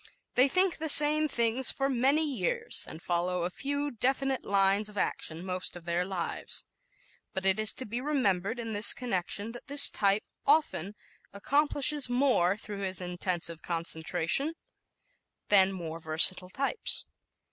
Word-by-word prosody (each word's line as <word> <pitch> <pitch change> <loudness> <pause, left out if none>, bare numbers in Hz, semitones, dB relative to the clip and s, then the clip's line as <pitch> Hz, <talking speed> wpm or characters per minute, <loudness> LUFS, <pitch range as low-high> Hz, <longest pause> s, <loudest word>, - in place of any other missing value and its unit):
They 255 +2 +4
think 370 +4 +2
the 315 0 -4
same 300 +1 +6
things 235 0 0
for 270 - -1
many 275 +4 +1
years 245 - -2
and 160 - -9
follow 175 0 -2
a 175 - -3
few 285 +5 -4
definite 265 +3 -1
lines 200 +1 +1
of 210 - -14
action 165 -1 -3
most 185 -1 -4
of 175 -1 -12
their 170 +1 -1
lives. 185 -3 -4 0.7
But 190 0 -3
it 195 +2 +2
is 215 0 +6
to 260 - -7
be 235 +4 -5
remembered 230 -7 -1
in 225 -2 -6
this 205 +1 +6
connection 205 -2 -3
that 240 - -12
this 285 0 +6
type 200 0 +1 0.2
often 280 - 0 0.4
accomplishes 285 +4 +1
more 245 -8 +1
through 210 -2 -8
his 185 -2 -2
intensive 175 -2 -4
concentration 170 - -1 0.9
than 195 -2 +6
more 165 -3 -7
versatile 165 +3 +2
types. 275 - -2
210 Hz, 145 wpm, -28 LUFS, 180-270 Hz, 0.9 s, same